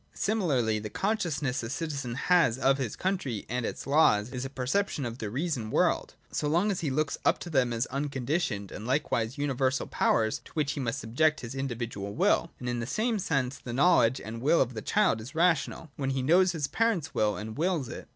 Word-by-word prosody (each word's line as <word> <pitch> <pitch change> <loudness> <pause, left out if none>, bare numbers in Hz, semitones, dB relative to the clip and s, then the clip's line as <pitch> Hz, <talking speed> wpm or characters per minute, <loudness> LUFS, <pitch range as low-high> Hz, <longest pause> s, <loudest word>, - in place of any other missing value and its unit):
Similarly, 140 - +1
the 105 0 -6
consciousness 160 - -1
a 115 - -5
citizen 140 -4 -3
has 165 -4 +3
of 135 +1 +2
his 125 -6 -2
country 160 - -2
and 125 0 -2
its - - -6
laws 125 -7 +3
is 125 -1 -4
a 135 - -4
perception 140 +3 -1
of 120 +1 -5
the 105 - -3
reason 130 -2 -2
world, - - +1 0.2
so 150 - -1
long 175 +8 +2
as 190 - -2
he 155 - -1
looks 145 +2 -1
up - - +3
to 175 - -8
them 130 -5 +2
as 115 +1 0
unconditioned 135 - -2
and 105 - -7
likewise 125 -2 0
universal 135 -2 0
powers, 110 -1 +1
to - - -15
which 150 -3 0
he 150 - -4
must 120 -4 -1
subject 155 +7 +1
his 120 -1 -6
in 135 0 -2
dividual 110 -5 -5
will. - - +2
And 125 - -6
in 120 -1 -1
the 115 - -3
same 220 - 0
sense, 140 -7 -1
the 120 - -7
knowledge 135 -4 +4
and 115 +2 -7
will 150 +6 +4
of 125 -1 +1
the 110 - -5
child 110 - +2
is 130 +8 -10
rational, 165 -2 +1
when 135 -2 -1
he 135 -1 -1
knows 180 +6 +5
his 155 -4 -1
parents' 215 -5 0
will, 105 -1 +1
and 110 +1 -6
wills 165 -4 0
it. - - -8
135 Hz, 215 wpm, -29 LUFS, 120-160 Hz, 0.2 s, knows